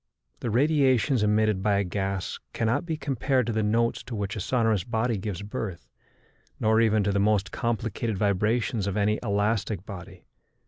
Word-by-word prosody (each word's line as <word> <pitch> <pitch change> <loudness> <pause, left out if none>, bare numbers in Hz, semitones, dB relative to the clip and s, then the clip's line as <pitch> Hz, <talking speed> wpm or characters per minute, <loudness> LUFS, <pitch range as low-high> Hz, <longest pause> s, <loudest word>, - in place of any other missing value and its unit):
The 120 - -3
radiations 130 -2 +3
emitted 105 -1 +2
by 105 0 +2
a 100 - +2
gas 95 0 -3
cannot 115 +9 0
be 160 -2 -2
compared 135 -3 0
to 115 - -2
the 110 - +1
notes 115 +2 +1
to 125 - -6
which 100 0 -3
a - - -4
sonorous 110 -2 +1
body 115 +2 0
gives 100 -2 -4
birth, 100 - -5 0.7
nor 110 +1 +3
even 110 -2 +3
to 100 - +1
the 100 - +1
most 105 -1 +2
complicated 115 -1 -2
vibrations 105 +2 +1
of 100 +1 -2
any 105 +1 +2
elastic 105 -2 0
body. 95 -2 -10
110 Hz, 170 wpm, -26 LUFS, 100-115 Hz, 0.7 s, radiations